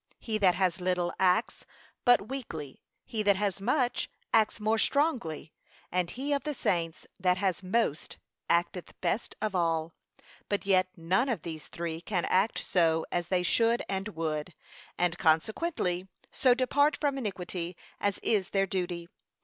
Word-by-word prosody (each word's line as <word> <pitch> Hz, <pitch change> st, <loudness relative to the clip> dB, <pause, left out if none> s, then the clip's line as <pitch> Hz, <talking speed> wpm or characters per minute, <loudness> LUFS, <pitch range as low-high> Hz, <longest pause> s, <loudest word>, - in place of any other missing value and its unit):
He 220 Hz, -2 st, -3 dB
that 185 Hz, -3 st, +4 dB
has 185 Hz, -1 st, +1 dB
little, 180 Hz, -1 st, 0 dB
acts 185 Hz, +4 st, +2 dB, 0.4 s
but 245 Hz, -5 st, +5 dB
weakly; 165 Hz, -, -6 dB, 0.2 s
he 220 Hz, -, -2 dB
that 205 Hz, -1 st, +4 dB
has 200 Hz, -1 st, -1 dB
much, 250 Hz, +3 st, +1 dB, 0.2 s
acts 220 Hz, 0 st, +3 dB
more 220 Hz, +1 st, +1 dB
strongly; 235 Hz, -, 0 dB, 0.4 s
and 180 Hz, -1 st, 0 dB
he 275 Hz, +7 st, -2 dB
of 280 Hz, -, +1 dB
the 300 Hz, 0 st, -3 dB
saints 165 Hz, -7 st, -1 dB
that 180 Hz, -1 st, +3 dB
has 185 Hz, -3 st, 0 dB
most, 190 Hz, -4 st, -1 dB, 0.3 s
acteth 175 Hz, +1 st, 0 dB
best 230 Hz, -, -1 dB
of 215 Hz, -2 st, 0 dB
all: 165 Hz, -2 st, 0 dB, 0.6 s
but 205 Hz, -1 st, -1 dB
yet 185 Hz, -2 st, +4 dB
none 185 Hz, +10 st, +1 dB
of 220 Hz, -10 st, -1 dB
these 160 Hz, -2 st, -7 dB
three 165 Hz, -1 st, -4 dB
can 180 Hz, -1 st, -1 dB
act 195 Hz, +4 st, +2 dB
so 165 Hz, -3 st, +2 dB
as 175 Hz, -1 st, -1 dB
they 180 Hz, 0 st, +1 dB
should 230 Hz, +6 st, +3 dB
and 195 Hz, +1 st, -2 dB
would, 155 Hz, 0 st, -3 dB, 0.4 s
and, 175 Hz, 0 st, +1 dB
consequently, 180 Hz, -, +1 dB, 0.2 s
so 250 Hz, -2 st, +4 dB
depart 285 Hz, +4 st, +2 dB
from 285 Hz, -2 st, 0 dB
iniquity 180 Hz, -5 st, -4 dB, 0.2 s
as 200 Hz, -1 st, 0 dB
is 200 Hz, -4 st, +1 dB
their 195 Hz, -1 st, +2 dB
duty. 175 Hz, -2 st, -3 dB
185 Hz, 155 wpm, -29 LUFS, 170-225 Hz, 0.6 s, but